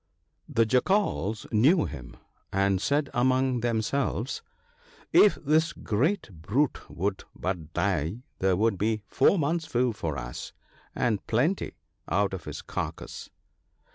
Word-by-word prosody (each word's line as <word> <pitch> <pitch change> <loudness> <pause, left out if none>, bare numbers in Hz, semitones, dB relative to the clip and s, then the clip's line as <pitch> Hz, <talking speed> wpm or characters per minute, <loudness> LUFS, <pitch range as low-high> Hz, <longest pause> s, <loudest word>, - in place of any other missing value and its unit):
The 115 - +3
Jackals 125 - +1
knew 145 - +4
him, 65 -3 -8 0.3
and 100 -1 +2
said 145 +5 +1
among 130 +1 +2
themselves, 120 +1 -1 0.4
' - - -30 0.3
If 210 - +7
this 155 +2 +2
great 150 - 0
brute 130 - 0
would 95 +2 -2
but 90 -5 -3
die, 95 - 0 0.2
there 95 -1 +3
would 110 -2 +1
be 110 0 0
four 195 - +3
months' 160 +1 0
food 120 -2 +1
for 80 -7 -3
us, 60 0 -6 0.4
and 110 -5 0
plenty, 140 - +1 0.3
out - - +1
of - - -6
his - - -6
carcase.' - - -5
115 Hz, 130 wpm, -27 LUFS, 100-140 Hz, 0.4 s, If